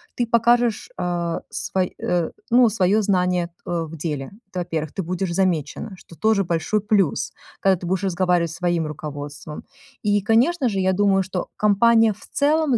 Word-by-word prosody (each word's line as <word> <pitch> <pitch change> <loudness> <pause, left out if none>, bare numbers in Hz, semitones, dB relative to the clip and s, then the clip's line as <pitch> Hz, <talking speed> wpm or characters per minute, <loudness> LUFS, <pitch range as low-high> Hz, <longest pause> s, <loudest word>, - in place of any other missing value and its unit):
ты 240 - 0
покажешь, 235 - +2
э, 175 -1 -1
свой 185 -1 -2
э, 175 -2 0 0.2
ну, 240 0 +6
свое 205 0 +2
знание, 180 -3 +1
т, 170 - -30 0.2
э, 170 -1 0
в 160 +1 -9
деле. 150 -3 -4 0.2
Это 185 - -5
во-первых. 160 -3 -3
Ты 190 - -3
будешь 180 +1 -2
замечена. 185 +2 -1
Что 170 - -15
тоже 215 0 +2
большой 170 +5 0
плюс, 200 -6 +1 0.3
когда 195 -1 +3
ты 175 - -8
будешь 190 +3 -1
разговаривать 180 -2 +1
со 165 - -8
своим 175 -3 0
руководством. 145 -1 -7 0.4
И, 205 -3 +2
конечно 245 - +2
же, 195 -3 -2
я 190 0 +2
думаю, 195 0 +3
что 185 -1 -4
компания 225 +2 +4
в 210 - -16
целом 295 -2 +2
185 Hz, 175 wpm, -22 LUFS, 170-215 Hz, 0.4 s, ну